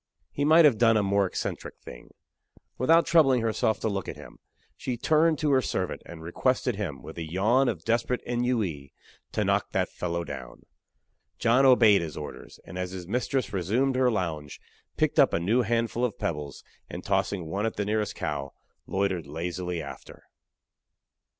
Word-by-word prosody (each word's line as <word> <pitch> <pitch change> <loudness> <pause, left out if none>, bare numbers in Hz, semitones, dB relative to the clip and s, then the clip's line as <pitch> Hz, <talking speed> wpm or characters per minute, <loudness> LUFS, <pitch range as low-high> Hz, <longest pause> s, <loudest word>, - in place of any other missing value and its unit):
He 145 - -2
might 160 +2 +7
have 125 -8 +4
done 115 -2 +5
a 105 - +2
more 100 0 +2
eccentric - - -5
thing. - - -12 0.7
Without 165 +7 +5
troubling 135 -7 +4
herself 110 -1 0
to - - 0
look 100 -4 -2
at - - -6
him, - - -13 0.4
she 125 -2 -4
turned 155 +5 +3
to 150 0 0
her 130 -1 +4
servant 95 -7 -3
and 80 -1 -10
requested 125 +7 0
him, 85 -10 -5
with 80 - -9
a 80 -1 -6
yawn 115 +9 +3
of - - -4
desperate 120 +2 0
ennui, 115 - -1 0.4
to - - 0
knock - - 0
that - - +1
fellow 85 -1 -3
down! 65 -5 -9 0.7
John 125 +4 +4
obeyed 115 -7 +6
his 80 -3 -6
orders; 75 - -9
and, 90 - -8
as 90 0 -2
his 90 -2 -8
mistress 125 +2 -1
resumed 115 +9 +1
her 130 -1 +3
lounge, 80 -9 -3 0.4
picked - - +1
up - - +5
a - - +1
new 110 +9 +2
handful 115 +1 0
of 120 -4 -1
pebbles, 75 -4 -4 0.3
and - - -7
tossing 95 -4 0
one 100 +7 -1
at 115 - -4
the 100 - -2
nearest 105 0 -1
cow, 70 0 -4 0.3
loitered 95 -4 -1
lazily 85 +2 -4
after. 70 - -11
105 Hz, 175 wpm, -27 LUFS, 85-125 Hz, 0.7 s, might